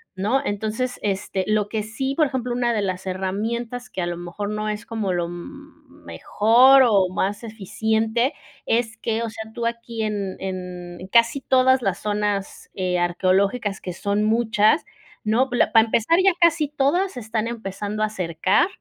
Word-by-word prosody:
¿no? 215 +8 +1
Entonces, 220 +5 -2
este, 195 -1 -1
lo 215 -1 +1
que 215 0 -3
sí, 265 +6 -3
por 310 - +4
ejemplo, 250 -2 -3
una 240 -1 +1
de 215 - 0
las 185 -1 -3
herramientas 225 +6 -3
que 185 - -4
a 175 - -1
lo 175 - -3
mejor 175 +4 -5
no 215 0 -2
es 210 +2 -4
como 220 -4 -2
lo, 175 -1 -1
mm, 280 - -12
mejor 255 +5 +5
o 195 -5 +3
más 200 +4 -1
eficiente, 220 - -1 0.3
es 225 -1 0
que, 225 0 -2
o 230 - -2
sea, 220 0 -8
tú 235 - -3
aquí 235 -1 -4
en 205 -3 -3
en 180 -2 -6
en 185 - -8
casi 235 +7 +3
todas 260 0 +3
las 195 -3 -1
zonas, 205 -1 -2
eh, 180 -1 -1
arqueológicas, 195 +4 +1
que 180 - -5
son 200 +4 -1
muchas, 220 +3 +2 0.4
¿no?, 235 +5 +2
la 245 - +2
para 225 -1 +7
empezar 230 +8 +2
ya 390 - +6
casi 335 -4 +3
todas 300 +7 +1
se 250 - -6
están 220 0 -2
empezando 215 -2 -5
a 215 - +1
cercar 185 - +1
215 Hz, 175 wpm, -23 LUFS, 195-240 Hz, 0.4 s, para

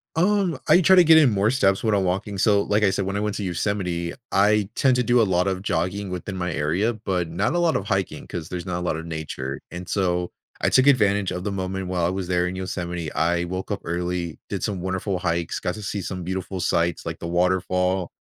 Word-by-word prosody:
Um, 185 -2 +2
I 180 - +6
try 190 +2 +6
to 180 - +8
get 160 -1 +7
in 145 -5 +5
more 105 0 +2
steps 100 -7 +2
when 110 -2 +2
I'm 100 -2 +2
walking. 95 +2 -2
So, 100 0 +4
like 105 +1 +1
I 100 - +5
said, 95 0 -1
when 95 +1 -3
I - - 0
went 105 0 -2
to 105 - -3
Yosemite, 90 -2 -2 0.2
I 105 +1 +3
tend 130 -2 +3
to 125 - +2
do 120 +1 +4
a - - +5
lot 90 -2 +1
of 95 -1 -1
jogging 95 +2 -2
within 90 +2 -5
my 90 -1 -2
area, 85 +10 0
but 95 -6 -2
not 90 - 0
a 175 - +1
lot 170 -2 +2
of 100 - -1
hiking 95 -2 -2
'cause 85 -2 -6
there's 90 0 -5
not 90 -2 -2
a - - -5
lotta 80 -2 -2
nature. 75 -5 -5
And 90 0 -7
so 90 -3 0 0.3
I - - +3
took 130 +1 +4
advantage 105 -7 +3
of 90 - -4
the 105 - -2
moment 95 -1 -3
while 90 -2 0
I - - +2
was 95 -1 -3
there 90 0 +1
in 90 - -4
Yosemite; 90 -3 -4
I 85 +1 +1
woke 95 +2 -5
up 100 - -2
early, 85 -1 -3
did - - -3
some 95 -4 -2
wonderful 95 +1 -2
hikes, 85 -2 -1
got - - -2
to 105 - -8
see 100 0 -3
some 90 0 -5
beautiful 95 +1 -4
sights 85 -1 0
like 80 0 -5
the 85 - -5
waterfall. 90 +1 +1
95 Hz, 245 wpm, -23 LUFS, 90-105 Hz, 0.3 s, to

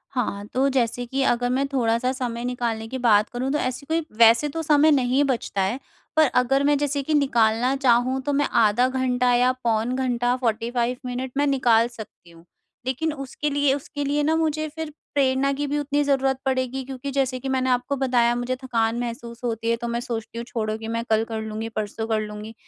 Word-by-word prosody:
हाँ, 205 -5 -2
तो 270 +2 +2
जैसे 245 -2 0
कि 265 +3 -2
अगर 245 0 +1
मैं 265 +2 +1
थोड़ा-सा 250 -2 +1
समय 245 -3 -4
निकालने 235 -3 -2
की 260 - -5
बात 220 -3 +3
करूँ, 255 +2 -3
तो 295 - +1
ऐसी 255 +2 -3
कोई 325 +1 -1
वैसे 230 +5 +6
तो 325 +3 -4
समय 305 0 +4
नहीं 265 0 +3
बचता 240 -7 -1
है, 210 +8 -1 0.4
पर 315 -1 +5
अगर 270 +3 +1
मैं 290 0 +3
जैसे 285 0 -1
कि 310 - -2
निकालना 245 -3 +2
चाहूँ, 255 0 +2
तो 285 +2 -2
मैं 285 +1 +2
आधा 225 +4 +3
घंटा 250 -1 +1
या 250 +1 +4
पौन 230 +1 0
घंटा, 245 -1 0
45 235 +2 0
मिनट 250 +1 -4
मैं 290 0 +2
निकाल 240 -4 +3
सकती 220 -7 -12
हूँ। 165 0 -18 0.4
लेकिन 305 +5 -1
उसके 275 +1 -4
लिए 285 -1 +2
उसके 285 +1 -4
लिए 290 +1 +1
ना 320 +2 +2
मुझे 310 -1 0
फिर 320 -1 -4 0.2
प्रेरणा 275 0 +2
की 290 +1 -2
भी 290 - -1
उतनी 290 0 0
ज़रूरत 270 -1 +1
पड़ेगी 260 0 -1
क्योंकि 270 +1 -6
जैसे 260 -2 0
कि 265 +2 -5
मैंने 260 -1 0
आपको 250 +2 0
बताया, 245 -3 +2
मुझे 245 +1 -2
थकान 235 -3 -1
महसूस 235 -1 -6
होती 230 -1 -2
है, 230 - +3
तो 235 0 -5
मैं 235 0 -1
सोचती 235 -2 -5
हूँ 235 - -4
छोड़ो 220 -3 -3
कि 225 0 -7
मैं 230 0 -2
कल 220 0 +3
कर 220 -1 -3
लूँगी, 220 +1 -5
परसों 220 0 -4
कर 220 -1 +1
लूँगी। 210 +1 -7
250 Hz, 210 wpm, -24 LUFS, 230-275 Hz, 0.4 s, वैसे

